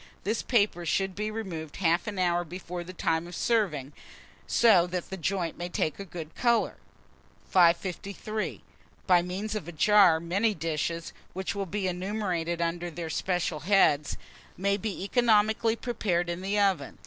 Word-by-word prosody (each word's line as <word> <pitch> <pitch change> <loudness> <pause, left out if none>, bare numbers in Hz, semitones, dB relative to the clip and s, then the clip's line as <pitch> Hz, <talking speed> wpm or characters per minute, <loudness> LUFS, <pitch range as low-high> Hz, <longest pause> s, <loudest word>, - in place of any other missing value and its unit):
This 215 +3 -1
paper 205 -7 +1
should 190 +3 0
be 210 +3 -3
removed 180 -9 -5
half 175 +1 +1
an 205 -2 -4
hour 175 -1 +2
before 175 +1 -6
the 180 - -9
time 165 -2 -1
of 175 - -8
serving 170 - 0
dinner, - - -21 0.5
so 200 -7 +5
that 180 0 -4
the - - -2
joint 185 -2 -2
may 175 0 -3
take 155 -2 -1
a 200 - -5
good 165 -3 -8
colour. 235 -1 +1 0.7
553. 190 +4 +1 0.4
BY 180 -2 +5
MEANS 190 +4 -4
OF 210 -7 -4
A - - -5
JAR, 180 0 +5
many 195 +6 0
dishes, 165 +1 -3 0.2
which 190 +2 -3
will 200 -1 -3
be 195 +1 -2
enumerated 180 -3 -2
under 170 +1 -2
their 165 0 -5
special 175 -3 -1
heads, 155 -6 +3 0.4
may 200 +2 +1
be 200 -2 -4
economically 220 0 +3
prepared 190 -8 -1
in 170 +1 -5
the 200 +2 0
oven. 190 -8 +1
185 Hz, 160 wpm, -28 LUFS, 170-205 Hz, 0.7 s, so